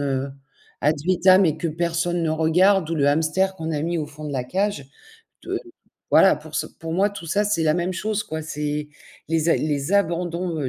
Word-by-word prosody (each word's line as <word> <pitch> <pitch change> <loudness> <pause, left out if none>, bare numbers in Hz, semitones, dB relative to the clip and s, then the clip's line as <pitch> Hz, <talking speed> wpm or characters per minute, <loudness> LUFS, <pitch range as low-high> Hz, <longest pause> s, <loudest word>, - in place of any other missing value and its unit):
heu, 135 -1 -1 0.5
ad 150 +2 +3
vitam 185 +1 +5
et 155 0 0
que 170 - -2
personne 170 +1 -1
ne 160 - 0
regarde 165 +3 +3
ou - - 0
le 140 -1 +2
hamster 165 +6 +1
qu'on 160 -1 -4
a 145 - -1
mis 170 +1 -1
au 150 - -3
fond 150 +1 -11
de 150 - -4
la 130 -2 -2
cage. 185 -1 -2 0.6
De - - -3 0.5
voilà, - - +6
pour - - -10
ce - - 0
pour 165 -2 -7
moi, 200 +3 +2
tout 200 -4 -9
ça, 205 +6 +1
c'est 205 -6 0
la 155 -1 +3
même 175 +2 -1
chose 210 +3 -2
quoi, 160 0 -5
c'est 150 -1 -4 0.4
les 165 0 +1
a - - +5
les 145 +2 -2
abandons 175 -2 0
165 Hz, 210 wpm, -23 LUFS, 150-185 Hz, 0.6 s, voilà